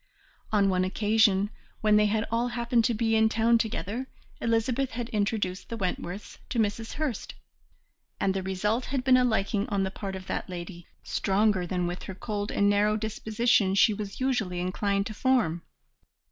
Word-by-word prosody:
On 205 -2 +3
one 185 -1 +2
occasion, 205 +1 +2 0.3
when 215 -1 +4
they 210 0 +5
had 215 +1 0
all 235 +1 +1
happened 235 -1 +1
to 240 - +2
be 225 0 +1
in 220 0 +4
town 230 +1 +3
together, 225 +3 -3 0.3
Elizabeth 230 +3 +1
had 240 0 -4
introduced 205 -4 -1
the 230 - -4
Wentworths 185 0 -4
to - - -3
Mrs. 225 +1 -1
Hurst, 290 -8 -3 0.8
and 190 - +1
the 190 - -2
result 205 +6 -1
had 265 -1 -2
been 260 0 +5
a 255 - +5
liking 210 -3 0
on 200 -2 +1
the 190 - -2
part 195 -1 -5
of 190 0 -7
that - - -4
lady 175 -1 -7 0.2
stronger 195 -2 +1
than 180 0 -1
with 175 +1 -4
her 190 - -7
cold 205 0 -3
and 200 - +2
narrow 205 +1 +3
disposition 220 -1 +1
she 215 +2 +5
was 205 -1 -6
usually 220 -9 0
inclined 200 +2 0
to 215 - -5
form. 215 -9 +1
210 Hz, 175 wpm, -27 LUFS, 195-230 Hz, 0.8 s, they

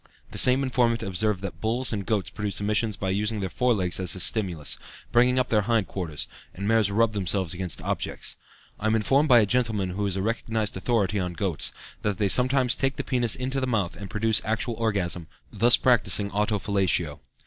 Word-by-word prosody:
The - - +1
same 130 +2 +6
informant 120 -3 +1
observed 100 0 -1
that 90 -2 -6
bulls 120 +2 0
and 100 -2 -4
goats 100 -6 -1
produce 105 -1 -2
emissions 105 +1 0
by 95 -1 -2
using 105 +2 -1
their 95 -3 -3
forelegs 105 -9 +1
as 95 0 +1
a - - -6
stimulus, 90 -7 0 0.4
bringing 125 +2 +4
up 130 -1 +1
their 105 -2 +3
hind 110 -1 +1
quarters, 85 -6 -5 0.3
and 100 +2 -4
mares 110 -2 +3
rub 110 +2 +2
themselves 95 -3 0
against 90 -1 -4
objects. - - -3 0.4
I 110 - -1
am 110 - +2
informed 135 +7 +2
by 120 -2 +7
a - - +3
gentleman 110 -5 0
who 100 +2 -2
is 95 - -2
a 95 - -2
recognized 110 -1 -2
authority 100 -1 0
on 90 -1 -3
goats, 90 -3 -2 0.3
that 105 -2 -1
they 100 -2 +1
sometimes 125 +5 +3
take 135 0 -1
the - - -3
penis 120 -3 +1
into 130 +1 -2
the 130 - -1
mouth 100 -8 -1
and 95 +3 -8
produce 110 0 +2
actual 110 +2 -2
orgasm, 100 -7 -1 0.3
thus 120 +4 +5
practicing 105 -4 +2
auto 105 +1 0
fellatio. 90 -7 -1
105 Hz, 200 wpm, -25 LUFS, 95-115 Hz, 0.4 s, by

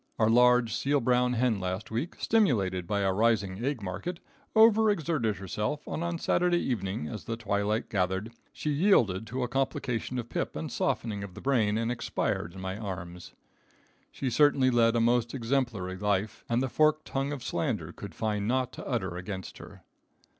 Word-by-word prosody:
Our 110 0 +3
large 125 -1 +5
seal 140 +3 +1
brown 125 0 +2
hen 120 -3 +1
last 95 +3 -4
week, 125 +10 -3
stimulated 100 - +1
by 100 +1 0
a 95 -1 +2
rising 105 -1 +1
egg 135 -5 -2
market, 165 - -4 0.4
over 220 0 +6
exerted 155 - 0
herself, 105 +9 -3
and 165 - -3
on 170 0 -2
Saturday 175 +1 +2
evening, 95 - -2
as 110 - -7
the 115 -2 -3
twilight 105 0 -1
gathered, 95 +2 -1 0.2
she 150 - -3
yielded 120 - +3
to 125 +3 -2
a - - 0
complication 125 -1 -2
of 120 -2 -3
pip - - -3
and - - -4
softening 105 -3 -1
of 95 -3 -9
the - - -8
brain 110 -6 +2
and 115 +1 0
expired 100 -6 -2
in 95 - -8
my 95 +2 -4
arms. 90 -4 -7 0.8
She 130 -2 -3
certainly 140 -2 +4
led 115 -1 +4
a - - +3
most 120 +1 +2
exemplary 115 -7 -1
life 105 +1 -1
and 120 +2 +2
the - - 0
forked 155 +3 +2
tongue 135 +1 -2
of 145 -4 -5
slander - - -2
could - - -9
find 105 -2 -1
naught 130 +1 0
to - - -8
utter 95 -9 -2
against 95 +1 -6
her. - - -12
115 Hz, 180 wpm, -29 LUFS, 100-135 Hz, 0.8 s, over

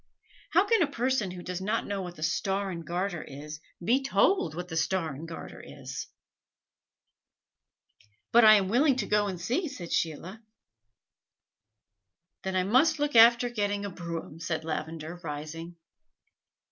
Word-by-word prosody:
How 365 +4 +5
can 450 0 +3
a 310 - +3
person 255 -6 0
who 180 -1 -8
does 180 0 -4
not 215 +4 -1
know 200 -1 -3
what 180 -1 -7
the 155 - -7
Star 195 +4 -1
and 170 -2 -6
Garter 175 -1 -2
is, 150 +2 -9 0.3
be 255 +7 +3
told 270 - +2
what 180 +1 -5
the 165 - -6
Star 160 -1 0
and 155 +5 -8
Garter 165 - -9
is?" - - -7 2.2
"But 235 +1 +7
I 215 0 +9
am 195 -2 +2
willing 260 +7 +3
to 240 -6 -1
go 210 0 +2
and 185 -3 -4
see," 255 - -1
said 185 - -8
Sheila. 175 +7 -2 2.0
"Then 190 0 -3
I 185 - +2
must 255 - +3
look 290 -2 -1
after 235 +2 +7
getting 205 -3 -2
a 200 - -5
brougham," 170 -2 -6
said 160 -1 -3
Lavender, 160 +1 -5
rising. 160 +3 -6
190 Hz, 155 wpm, -28 LUFS, 165-230 Hz, 2.2 s, I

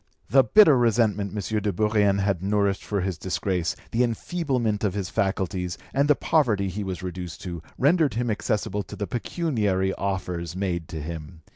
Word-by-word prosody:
The 135 0 +7
bitter 195 - +7
resentment 110 -4 +2
M. 105 +1 -2
de 105 - 0
Bourrienne 105 0 +2
had 95 -3 0
nourished 100 0 +1
for 100 -2 -1
his 90 -2 -3
disgrace, 90 -2 -1 0.2
the 115 - +1
enfeeblement 120 -4 -1
of 100 -2 0
his 95 -3 -3
faculties, 95 -2 -1 0.2
and 140 +1 +2
the 150 - +5
poverty 110 -14 +2
he 100 +3 -4
was 95 -2 -5
reduced 90 -2 -6
to, 85 -4 -5 0.2
rendered 150 -2 +3
him 120 0 0
accessible 105 -1 -1
to - - -9
the 105 - -3
pecuniary 105 - -1
offers 90 -3 -3
made 90 -4 -2
to 80 - -6
him. 80 +1 -7
100 Hz, 170 wpm, -25 LUFS, 90-115 Hz, 0.2 s, The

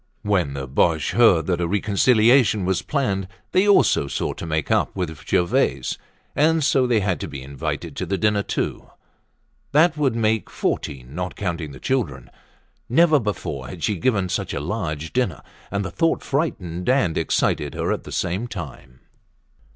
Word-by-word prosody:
When 90 -9 0
the 70 -1 -5
Boches 80 +5 +1
heard 95 -5 +5
that 90 -2 0
a 85 - 0
reconciliation 110 +3 +3
was 95 -1 0
planned, 100 -10 -1 0.2
they 190 +3 +3
also 195 - +4
sought - - -2
to 85 - -5
make 80 -2 -1
up - - +1
with 80 -7 -5
Gervaise, 65 -7 +1 0.4
and 160 +1 +3
so 130 -2 +3
they 115 -3 +2
had 95 -2 0
to - - -4
be 70 -2 -7
invited 70 0 -5
to - - -3
the 95 - 0
dinner 105 +1 +2
too. - - -3 0.8
That 160 +2 +4
would 135 -6 +1
make 110 -1 0
fourteen, 65 -2 -3
not 90 +3 -4
counting 85 -6 -3
the 65 - -11
children. 75 - -2 0.6
Never 155 +4 +5
before 90 - -4
had 80 +4 -8
she 105 - +1
given 100 0 +1
such - - -3
a - - -1
large 80 -2 -4
dinner 125 -8 -1 0.3
and 100 0 -2
the 90 - -5
thought 165 - +1
frightened 100 - -2
and 130 - +2
excited 75 -1 0
her - - -1
at - - -2
the - - -10
same 95 +6 -2
time. 70 - -9
95 Hz, 170 wpm, -22 LUFS, 80-120 Hz, 0.8 s, heard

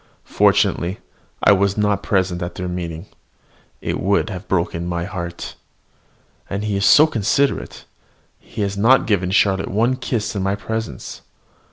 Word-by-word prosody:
Fortunately 90 +4 +2 0.5
I - - +7
was 100 0 +2
not 105 -1 +1
present 95 -3 0
at 85 - -5
their 90 - -4
meeting. 85 -1 -5 0.8
It - - -2
would 100 +3 +1
have 95 +1 -7
broken 85 -1 -1
my 85 -1 -2
heart! 85 -3 -6 1.0
And 100 +1 -3
he 105 -1 -1
is 100 - +2
so 155 - +8
considerate: 140 +1 -1 0.5
he 105 - -5
has 100 0 -2
not 115 +7 +4
given 95 -4 +1
Charlotte 95 0 +2
one 115 +6 +1
kiss 115 -4 -2
in 100 - -1
my 95 +1 0
presence. 110 +2 -5
100 Hz, 150 wpm, -20 LUFS, 90-105 Hz, 1.0 s, so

